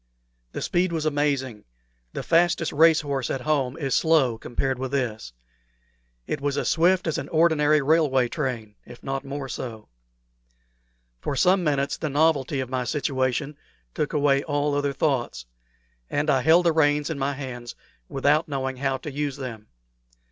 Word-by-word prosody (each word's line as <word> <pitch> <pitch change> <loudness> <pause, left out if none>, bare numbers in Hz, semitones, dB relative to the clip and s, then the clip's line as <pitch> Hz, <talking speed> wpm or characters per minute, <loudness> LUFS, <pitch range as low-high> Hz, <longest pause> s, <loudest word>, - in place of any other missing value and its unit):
The - - -4
speed 175 0 +1
was 160 -2 -2
amazing; 140 -6 -1 0.5
the - - -5
fastest 170 -1 +2
race 160 +1 +5
horse 140 -4 -3
at 135 - -2
home 135 -3 0
is 135 -4 -2
slow 140 -8 +3
compared 130 +2 -2
with 130 0 -4
this. 115 - -2 0.9
It 140 - -3
was 145 0 -1
as - - 0
swift 180 +3 +3
as 160 - -1
an - - -7
ordinary 155 -2 +3
railway 140 -4 +3
train, 120 -7 -4
if 120 0 -14
not 135 0 -3
more 140 0 -5
so. 115 -4 -7 1.3
For 140 - -3
some 180 +7 +3
minutes 140 -3 0
the 155 - -3
novelty 145 -2 +1
of 130 - -4
my 130 0 -2
situation 135 +1 -1 0.4
took 150 - -2
away 140 -2 +2
all 145 -1 -1
other 145 0 0
thoughts, 125 - -1 0.6
and 145 +1 +1
I 130 - +2
held 165 +5 +5
the 170 - +5
reins 150 -1 +2
in 150 - -4
my 140 +1 0
hands 125 -3 -7 0.3
without 145 +4 +2
knowing 135 -2 -3
how 135 0 -1
to 150 - -7
use 145 0 -3
them. 115 -6 -7
140 Hz, 160 wpm, -24 LUFS, 130-155 Hz, 1.3 s, race